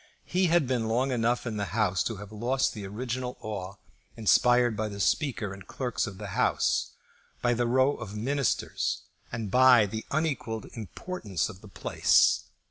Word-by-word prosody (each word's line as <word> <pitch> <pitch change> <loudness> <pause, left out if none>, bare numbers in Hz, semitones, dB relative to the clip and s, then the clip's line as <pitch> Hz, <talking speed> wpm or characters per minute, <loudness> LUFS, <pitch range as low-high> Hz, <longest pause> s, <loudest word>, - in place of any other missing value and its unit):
He 185 +1 +2
had 170 -3 +3
been 125 -3 0
long 125 +4 +1
enough 120 0 +1
in 110 -3 -3
the 100 0 -3
House 95 -5 +2
to 115 - -2
have 105 +1 -10
lost 120 +5 0
the 105 -3 -6
original 125 +4 -4
awe 100 -3 -5 0.4
inspired 120 +2 +4
by 110 +1 -1
the 100 -1 -7
Speaker 105 - 0
and 100 - -10
the - - -13
clerks 125 -3 -2
of 100 -2 -8
the 105 0 -7
House, - - +1 0.5
by 120 0 +3
the 120 0 0
row 130 +3 +3
of 105 -1 -7
Ministers, 135 +4 -1 0.3
and 115 -4 -4
by 125 -2 +7
the 110 +2 -5
unequalled 140 -8 -1
importance 110 - -4
of 95 -3 -11
the 105 - -12
place. 100 - +3
115 Hz, 175 wpm, -28 LUFS, 105-130 Hz, 0.5 s, by